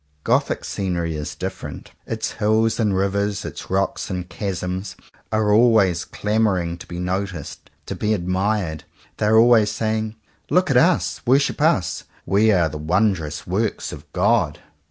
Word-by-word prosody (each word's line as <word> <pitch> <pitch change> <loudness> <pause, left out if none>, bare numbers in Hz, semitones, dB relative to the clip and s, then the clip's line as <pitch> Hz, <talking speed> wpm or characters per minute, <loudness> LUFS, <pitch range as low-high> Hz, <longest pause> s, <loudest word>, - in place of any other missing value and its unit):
Gothic - - +1
scenery 85 -4 -2
is 75 -1 -5
different. - - -6 0.2
Its - - -3
hills 110 +2 +2
and 105 -4 +1
rivers, 100 +1 -1
its - - -7
rocks - - -1
and 90 -1 -4
chasms 95 0 -4 0.4
are 110 -1 +2
always 105 -7 +4
clamouring 100 -6 0
to - - -11
be 85 - -7
noticed, 90 -2 -4 0.2
to - - -4
be 105 0 0
admired. 95 -2 -1 0.3
They 105 - 0
are 110 +1 +5
always 115 -2 +6
saying 110 0 -2 0.3
"Look 180 -3 +3
at 130 - +4
us. 170 +6 +2
Worship 135 +3 +2
us. - - +1 0.2
We 105 +3 +3
are 90 -5 +3
the 75 0 -6
wondrous 85 -2 0
works 105 +4 -2
of 75 0 -12
God." - - +2
100 Hz, 150 wpm, -22 LUFS, 90-110 Hz, 0.4 s, always